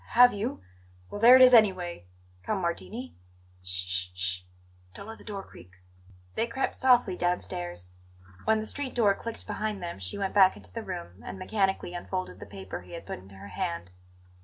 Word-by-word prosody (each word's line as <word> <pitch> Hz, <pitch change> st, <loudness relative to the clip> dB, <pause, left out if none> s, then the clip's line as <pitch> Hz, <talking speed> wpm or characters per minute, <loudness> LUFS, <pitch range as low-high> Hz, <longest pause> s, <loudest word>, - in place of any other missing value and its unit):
"H -, -, -13 dB
have 245 Hz, +1 st, +8 dB
you? 205 Hz, -, -3 dB, 0.5 s
Well, 205 Hz, -, -5 dB
there 240 Hz, +2 st, +10 dB
it 260 Hz, -, +9 dB
is, 255 Hz, 0 st, +8 dB
anyway. 185 Hz, -, +4 dB, 0.3 s
Come, 210 Hz, -, -1 dB
Martini. 205 Hz, +8 st, -4 dB, 0.5 s
Sh 90 Hz, 0 st, -1 dB
sh 90 Hz, 0 st, -1 dB
sh! 90 Hz, 0 st, 0 dB, 0.5 s
Don't -, -, -9 dB
let 225 Hz, -, -9 dB
the -, -, -13 dB
door 200 Hz, -3 st, -6 dB
creak!" 90 Hz, -, -15 dB, 0.6 s
They 230 Hz, -, 0 dB
crept 250 Hz, +3 st, -2 dB
softly 245 Hz, -7 st, +4 dB
downstairs. 90 Hz, -, -2 dB, 0.5 s
When 220 Hz, 0 st, +3 dB
the 215 Hz, -, -4 dB
street 275 Hz, +3 st, -2 dB
door 215 Hz, -5 st, +4 dB
clicked 230 Hz, +3 st, -6 dB
behind 210 Hz, -2 st, -3 dB
them 170 Hz, -, -5 dB
she 90 Hz, -1 st, -3 dB
went 195 Hz, -1 st, -2 dB
back 190 Hz, -2 st, +6 dB
into 100 Hz, -2 st, -12 dB
the -, -, -4 dB
room 85 Hz, +4 st, -7 dB
and -, -, -7 dB
mechanically 190 Hz, -2 st, -1 dB
unfolded 175 Hz, -, -4 dB
the -, -, -9 dB
paper 95 Hz, -2 st, -7 dB
he 90 Hz, 0 st, -14 dB
had -, -, -7 dB
put -, -, -6 dB
into 95 Hz, +1 st, -15 dB
her 100 Hz, +1 st, -10 dB
hand. 85 Hz, -2 st, -4 dB
185 Hz, 190 wpm, -28 LUFS, -, 0.6 s, there